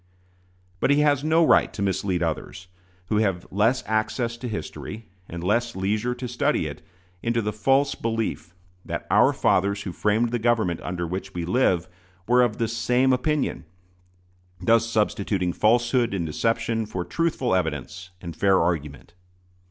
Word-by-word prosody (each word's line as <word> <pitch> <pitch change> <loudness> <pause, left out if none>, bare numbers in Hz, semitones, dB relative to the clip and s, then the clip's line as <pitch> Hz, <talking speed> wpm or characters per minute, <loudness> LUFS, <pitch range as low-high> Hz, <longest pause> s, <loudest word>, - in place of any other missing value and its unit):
But - - +1
he 145 +1 +4
has 145 -2 +2
no 160 +2 +4
right - - +4
to - - -6
mislead 95 -2 0
others, 85 +3 -4 0.4
who 105 - +1
have 95 -5 0
less 110 +7 +2
access 110 +2 -1
to 125 +1 -6
history, 110 0 -6 0.2
and 85 0 -6
less 115 +5 0
leisure 105 +6 -1
to 125 0 -5
study 120 - 0
it, - - -6 0.4
into 115 0 0
the 105 -1 -2
false 135 +6 +2
belief 115 -6 -3 0.3
that - - -5
"our - - +5
fathers 100 +1 +1
who 95 - -4
framed 110 +5 +1
the 120 - 0
government 110 -7 +1
under 90 -1 -3
which 95 +3 -5
we 85 -1 -2
live" 90 -4 +2 0.4
were 125 +1 +5
of 120 -3 +1
the 115 - 0
same 125 +3 +2
opinion 145 +3 -1 1.0
thus 115 +5 +3
substituting 100 -5 0
falsehood 120 0 +2
and 85 -3 -2
deception 115 +8 -1
for 90 -4 -4
truthful 150 - 0
evidence 90 +1 -2
and 85 -3 -7
fair 95 +2 +3
argument. 75 -4 -2
110 Hz, 155 wpm, -24 LUFS, 90-120 Hz, 1.0 s, our